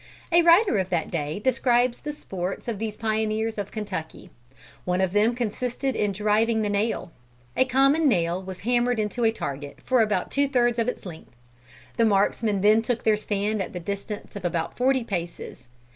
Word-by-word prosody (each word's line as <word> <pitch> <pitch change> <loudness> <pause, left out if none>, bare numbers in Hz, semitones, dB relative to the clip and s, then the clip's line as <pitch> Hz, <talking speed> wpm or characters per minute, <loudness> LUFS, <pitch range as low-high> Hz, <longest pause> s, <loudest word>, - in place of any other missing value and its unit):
A 340 +1 +6
writer 340 - +5
of 190 -1 -2
that 170 -3 -1
day 150 -2 -2
describes 245 +1 +2
the 300 - -5
sports 190 -10 -5
of 225 -4 -3
these 215 -1 -4
pioneers 220 0 -1
of 200 - -4
Kentucky. 200 -7 -6 0.5
One 180 0 0
of 190 -2 +1
them 215 +4 +2
consisted 250 +3 -2
in 210 -2 +1
"driving 215 +3 +1
the 205 - -1
nail." 205 -3 -1 0.4
A 260 - +4
common 275 +4 +3
nail 175 -4 +1
was 190 -1 -8
hammered 245 +1 +1
into 215 +3 -2
a 225 - +4
target 145 -8 -6
for 255 -2 +3
about 210 -4 0
two 280 0 +2
thirds 240 -3 +2
of 230 - +1
its 250 - -4
length. 160 -8 -10 0.6
The 230 - +4
marksmen 205 0 +1
then 215 +2 +5
took 235 +1 -2
their 220 -1 +4
stand 210 0 -1
at - - -5
the 180 - -4
distance 200 +4 -6
of 200 - -6
about 170 -2 -2
forty 260 0 +2
paces. 175 - -6
215 Hz, 185 wpm, -25 LUFS, 190-240 Hz, 0.6 s, A